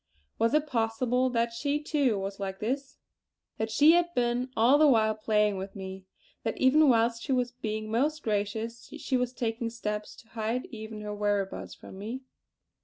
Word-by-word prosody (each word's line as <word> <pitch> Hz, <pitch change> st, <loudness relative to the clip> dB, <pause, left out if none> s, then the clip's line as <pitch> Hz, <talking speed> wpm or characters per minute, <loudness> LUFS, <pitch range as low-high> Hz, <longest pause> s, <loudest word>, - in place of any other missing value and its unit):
Was 230 Hz, +5 st, +3 dB
it 305 Hz, 0 st, +3 dB
possible 250 Hz, 0 st, +1 dB
that 235 Hz, -1 st, 0 dB
she 285 Hz, +5 st, -1 dB
too 285 Hz, -7 st, +1 dB
was 195 Hz, +1 st, -4 dB
like 190 Hz, -1 st, -4 dB
this; 270 Hz, +5 st, -3 dB, 0.6 s
that 220 Hz, 0 st, -1 dB
she 290 Hz, +8 st, +6 dB
had 345 Hz, 0 st, +3 dB
been 245 Hz, +1 st, +1 dB
all 245 Hz, +6 st, +5 dB
the 305 Hz, -, +7 dB
while 220 Hz, -5 st, +4 dB
playing 210 Hz, -1 st, +1 dB
with 195 Hz, +2 st, -6 dB
me; 190 Hz, -1 st, -8 dB, 0.3 s
that -, -, -3 dB
even 290 Hz, +3 st, +5 dB
whilst 230 Hz, -1 st, +3 dB
she 275 Hz, -, -4 dB
was 250 Hz, -2 st, +1 dB
being 215 Hz, -2 st, -4 dB
most 295 Hz, +7 st, 0 dB
gracious, 220 Hz, +2 st, -2 dB
she 260 Hz, -, -2 dB
was 250 Hz, -1 st, +1 dB
taking 230 Hz, -1 st, -2 dB
steps 210 Hz, -2 st, -4 dB
to 225 Hz, -, -17 dB
hide 225 Hz, +2 st, -2 dB
even 220 Hz, -1 st, -7 dB
her 210 Hz, 0 st, -5 dB
whereabouts 205 Hz, -1 st, -2 dB
from 190 Hz, -, -12 dB
me? 230 Hz, +6 st, -5 dB
230 Hz, 180 wpm, -29 LUFS, 210-255 Hz, 0.6 s, the